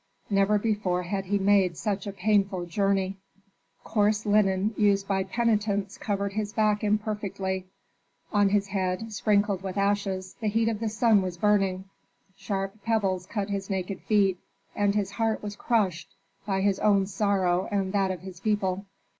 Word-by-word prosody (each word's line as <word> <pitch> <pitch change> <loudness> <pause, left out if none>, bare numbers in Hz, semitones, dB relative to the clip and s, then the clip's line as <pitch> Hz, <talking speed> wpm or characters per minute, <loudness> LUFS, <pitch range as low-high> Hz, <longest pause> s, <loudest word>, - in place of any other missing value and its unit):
Never 200 +1 +3
before 205 -4 0
had 195 +2 -3
he 200 +2 +1
made 195 -3 +3
such 200 -1 -2
a - - -2
painful 195 -2 +1
journey. 195 +1 0 0.7
Coarse 210 0 +1
linen 205 0 +2
used 200 -2 +2
by 195 -1 +1
penitents 210 -1 0
covered 200 -1 -2
his 210 0 -3
back 215 0 +1
imperfectly; 205 -3 -2 0.7
on 205 -1 +4
his 200 0 +2
head, 190 +3 -2
sprinkled 205 -2 +1
with 190 0 -5
ashes, 195 -2 -1
the 220 - -1
heat 225 +2 +2
of 220 -2 -3
the 225 -1 -1
sun 220 -1 +3
was 180 -2 -4
burning; 195 -1 +1 0.5
sharp 195 +1 -4
pebbles 195 -5 0
cut 205 -1 -3
his 195 0 -3
naked 190 -1 -3
feet, 195 -4 +2 0.4
and 205 0 +1
his 200 -2 0
heart 225 +1 -1
was 205 0 -5
crushed 195 -6 0 0.4
by 190 -1 0
his 195 -1 +1
own 200 -2 +3
sorrow 190 -2 +1
and 195 -1 -1
that 195 -1 +2
of 185 -2 -4
his 185 -2 -10
people. 200 -2 -1
200 Hz, 160 wpm, -27 LUFS, 190-210 Hz, 0.7 s, on